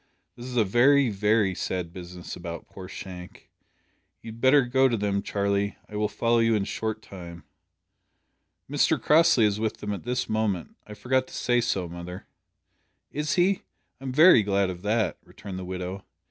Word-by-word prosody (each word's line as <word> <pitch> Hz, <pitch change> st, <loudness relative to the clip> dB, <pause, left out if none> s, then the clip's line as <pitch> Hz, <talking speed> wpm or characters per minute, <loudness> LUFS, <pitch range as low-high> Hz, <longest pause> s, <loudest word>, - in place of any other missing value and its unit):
"This 120 Hz, +1 st, -9 dB
is 125 Hz, -1 st, -5 dB
a 115 Hz, -, +5 dB
very, 130 Hz, +5 st, +4 dB
very 105 Hz, 0 st, +2 dB
sad 90 Hz, -1 st, -4 dB
business 90 Hz, -1 st, -8 dB
about 85 Hz, -1 st, -7 dB
poor 95 Hz, -1 st, -10 dB
Shank. 90 Hz, -1 st, -10 dB, 0.7 s
You 115 Hz, -, -8 dB
had 115 Hz, +1 st, -13 dB
better 135 Hz, +2 st, +6 dB
go 130 Hz, +2 st, +3 dB
to 115 Hz, -, 0 dB
them, 100 Hz, -1 st, 0 dB
Charlie. 100 Hz, 0 st, -1 dB
I 105 Hz, -, -10 dB
will 105 Hz, 0 st, +1 dB
follow 115 Hz, +2 st, +1 dB
you 115 Hz, -1 st, +3 dB
in 105 Hz, -, +1 dB
a -, -, -5 dB
short 110 Hz, +1 st, -4 dB
time." 85 Hz, -3 st, -10 dB, 1.2 s
"Mr -, -, +2 dB
Crossley 155 Hz, -7 st, +5 dB
is 105 Hz, 0 st, 0 dB
with 110 Hz, 0 st, -2 dB
them 105 Hz, 0 st, -4 dB
at 100 Hz, -, -5 dB
this 125 Hz, +1 st, -2 dB
moment. 110 Hz, -5 st, -2 dB
I 105 Hz, -, -9 dB
forgot 130 Hz, +4 st, 0 dB
to -, -, -11 dB
say 120 Hz, -1 st, +1 dB
so, 95 Hz, -6 st, -1 dB
mother." 85 Hz, +1 st, -8 dB, 0.9 s
"Is 150 Hz, 0 st, -1 dB
he? 185 Hz, +2 st, +2 dB, 0.4 s
I'm 135 Hz, -1 st, -5 dB
very 155 Hz, -2 st, +7 dB
glad 100 Hz, -2 st, +1 dB
of 90 Hz, -1 st, -9 dB
that," 110 Hz, +2 st, 0 dB
returned 95 Hz, -3 st, -9 dB
the 95 Hz, -, -6 dB
widow. 90 Hz, +1 st, -5 dB
105 Hz, 180 wpm, -26 LUFS, 95-120 Hz, 1.2 s, very